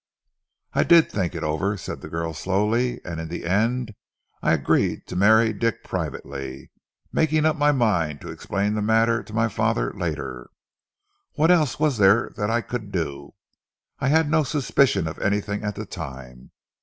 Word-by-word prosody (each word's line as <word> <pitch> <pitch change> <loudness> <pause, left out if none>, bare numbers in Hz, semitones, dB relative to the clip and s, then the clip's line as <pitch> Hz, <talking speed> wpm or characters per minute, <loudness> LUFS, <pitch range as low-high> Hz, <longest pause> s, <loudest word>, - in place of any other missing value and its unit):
"I - - +3
did 170 -2 +5
think 90 -3 -2
it 85 - -4
over," 85 +7 -1
said - - -7
the - - -8
girl 80 0 -3
slowly, 110 +8 0
"and 85 -2 -5
in 80 - -5
the 85 +1 -6
end 110 +6 0 0.5
I - - +2
agreed 70 -5 +1
to - - -8
marry 110 +4 +5
Dick 115 +1 -1
privately, 70 -1 -6 0.4
making 155 0 +2
up 155 - +3
my 150 0 +3
mind 90 - +1
to - - -7
explain 100 +2 -2
the 105 - -1
matter 115 +2 +2
to - - -14
my 115 +1 +2
father, 110 +2 0
later. 70 -10 -4 0.8
What 160 +4 +3
else 155 -9 +2
was 150 -7 +1
there 100 +4 +4
that 105 0 -1
I 120 +1 +1
could 110 -4 -6
do? 80 -7 -4 0.6
I - - 0
had 160 +2 +3
no 155 +1 +3
suspicion 135 - +1
of 80 - -6
anything 100 +1 -1
at 105 -1 -3
the 105 - -5
time. 65 -8 -9
105 Hz, 170 wpm, -24 LUFS, 85-120 Hz, 0.8 s, did